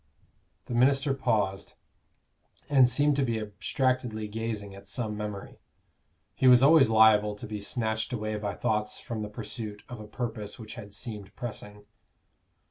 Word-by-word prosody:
The - - -7
minister 135 +3 +3
paused, 105 -7 -1 0.9
and 130 -3 +6
seemed 145 +3 +2
to 140 - +2
be 115 -3 -1
abstractedly 110 +1 -1
gazing 110 -2 -4
at 100 - -13
some 110 -4 -3
memory: 105 -1 -6 0.7
he 130 - +2
was 125 0 +8
always 145 -3 +7
liable 110 -2 +5
to 105 - -8
be 105 -1 -5
snatched 110 +1 -1
away 110 -3 -2
by 100 -2 -3
thoughts 105 +2 -1
from 115 -2 -5
the 105 - -4
pursuit 105 0 -6
of 120 -2 -8
a 105 - -9
purpose 110 -3 -5
which 110 -3 -9
had 105 -5 -9
seemed 100 -1 -6
pressing. 105 -4 -8
110 Hz, 150 wpm, -28 LUFS, 105-125 Hz, 0.9 s, was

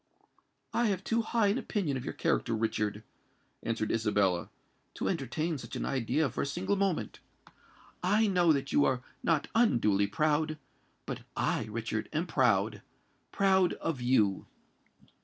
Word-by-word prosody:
"I 240 0 +2
have 195 -3 -1
too 230 0 +1
high 225 -2 +1
an 215 +6 +1
opinion 180 - -2
of 130 - -4
your - - -5
character, 115 - 0
Richard," 105 -1 -1 0.6
answered 110 -2 -2
Isabella, 100 -5 +1 0.5
"to - - -2
entertain 160 -1 -2
such - - -8
an - - -2
idea 135 +4 +1
for 125 - -3
a - - 0
single 180 +7 -1
moment. 195 -3 -1 0.8
I 205 +5 +3
know 180 -5 +4
that 140 -2 0
you 145 - +4
are 130 -3 +1 0.2
not 160 -4 +1
unduly 110 - +3
proud; 155 +7 +1 0.5
but - - -5 0.2
I, - - 0
Richard, 110 0 -3
am 155 +3 0
proud—proud 130 - 0
of 150 -6 -3
you!" 110 -6 +2
140 Hz, 140 wpm, -30 LUFS, 110-180 Hz, 0.8 s, know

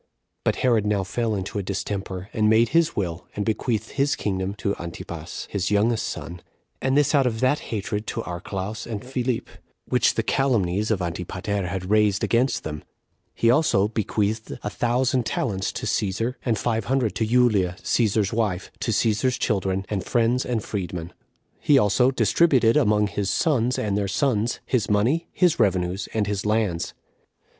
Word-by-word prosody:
But - - +1
Herod 115 -4 +3
now 105 -2 +1
fell 110 +3 -1
into 95 +1 -3
a - - -1
distemper, 95 -1 -4
and 110 -2 +2
made 115 +1 +4
his 165 +1 +2
will, 90 -4 -3
and 105 - -2
bequeathed 110 0 -1
his 140 +1 +1
kingdom 95 -1 -2
to 100 -1 -1
[Antipas], 85 -1 -7
his 95 -3 -1
youngest 110 +3 +1
son; 85 0 -7 0.4
and 135 +1 +2
this 145 0 +3
out 140 -3 +4
of 110 -2 -2
that 130 +3 +3
hatred 105 0 -3
to 115 - -3
Archelaus 95 +4 -5
and 110 -1 -5
Philip, 125 -2 -2 0.4
which - - +2
the - - 0
calumnies 105 -7 +1
of 100 -5 0
Antipater 90 +3 -3
had 90 +1 -4
raised 105 -2 +3
against 125 +3 +1
them. 75 -1 -5 0.5
He 115 - +3
also 115 -8 +3
bequeathed 110 0 -2
a 105 - -3
thousand 125 +1 +1
talents 95 -6 -1
to - - -4
Cæsar, 105 +5 0
and 115 -4 +1
five 115 +1 -1
hundred 125 -5 +1
to 110 - +1
Julia, 110 -7 +3
Cæsar's 110 -2 +1
wife, 105 -5 -1
to - - -3
Cæsar's 115 +3 +1
children, 95 -3 0
and 100 -3 -2
friends 120 +2 +1
and 115 -4 -1
freed 95 -5 -4
men. 85 0 -6 0.5
He 145 - +4
also 125 +2 +4
distributed 125 - +3
among 105 0 +3
his 100 -1 -2
sons 125 - +1
and 105 -2 -1
their 100 -1 0
sons 110 +2 0
his 120 -6 0
money, 120 +12 +2
his 180 -6 +2
revenues, 95 -3 +1
and 110 -2 0
his 100 -1 -2
lands. 105 -5 0
105 Hz, 170 wpm, -24 LUFS, 95-120 Hz, 0.5 s, made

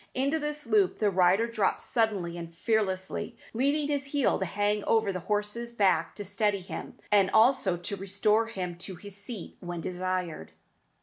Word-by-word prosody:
Into 280 +5 +1
this 300 -1 -2
loop 210 -5 +3
the 210 -2 +2
rider 185 +4 +4
drops 225 -4 0
suddenly 205 -7 0
and 170 -1 -8
fearlessly, 190 -2 -1 0.2
leaving 285 +5 +1
his 285 -1 -1
heel 280 -2 +1
to 190 - 0
hang 205 +3 0
over 220 -3 +2
the 185 - -3
horse's 210 +5 -2
back 185 -6 +2
to 205 - -6
steady 200 0 +1
him, 180 - -7
and 200 -2 +5
also 220 -6 +4
to 175 +3 -4
restore 205 +3 +1
him 180 -6 -5
to 190 +1 -6
his 200 +2 -7
seat 200 -1 -6
when 175 -1 -5
desired. 180 - -3
205 Hz, 170 wpm, -29 LUFS, 185-225 Hz, 0.2 s, and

